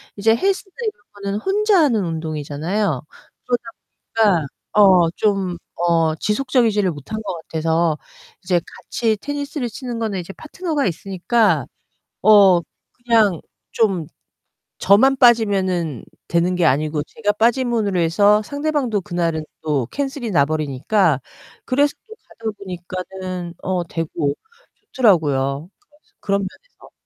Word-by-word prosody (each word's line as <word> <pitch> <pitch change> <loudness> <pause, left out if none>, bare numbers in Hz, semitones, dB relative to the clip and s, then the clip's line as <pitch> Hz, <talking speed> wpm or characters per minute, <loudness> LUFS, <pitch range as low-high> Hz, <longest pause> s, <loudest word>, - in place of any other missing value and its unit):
이제 225 +2 +3
헬스나 385 - -1
이런 425 - -4 0.2
거는 200 +1 -2
혼자 405 - +2
하는 230 -9 +2
운동이잖아요. 160 +1 -2 0.4
그러다 245 -1 0 0.7
보니까 165 -5 +1 0.3
어, 185 -5 +6
좀 195 -3 0 0.2
어 165 -2 +2
지속적이지를 210 - +1
못한 150 +9 -6
것 200 - -3 0.2
같아서 160 0 +1 0.5
이제 180 -3 +1
같이 220 -3 -2
테니스를 285 0 -4
치는 240 +1 -6
거는 210 -4 -2
이제 175 +2 -7
파트너가 315 - -3
있으니까 190 - +1 0.6
어, 200 -4 +7 0.3
그냥 225 -7 +2 0.3
좀 195 -8 +1 0.7
저만 260 +8 +4
빠지면은 190 - +2 0.2
되는 170 +2 +1
게 175 -2 +1
아니고 150 +2 +1
제가 205 +4 -2
빠짐으로 225 -4 +1
해서 205 +6 +4
상대방도 285 -6 -1
그날은 170 -4 -2 0.2
또 145 -6 -1
캔슬이 275 -4 -3
나버리니까 150 +2 +1 0.5
그래서 285 +3 +2
또 445 - -10 0.3
가다 220 - +1
보니까는 185 -1 -6
어 185 -1 -1
되고 160 -3 -2 0.6
좋더라고요. 150 - +2 0.2
그래서 310 +8 -31
그런 200 0 0
면에서. 345 - -10
195 Hz, 285 characters per minute, -20 LUFS, 165-235 Hz, 0.7 s, 어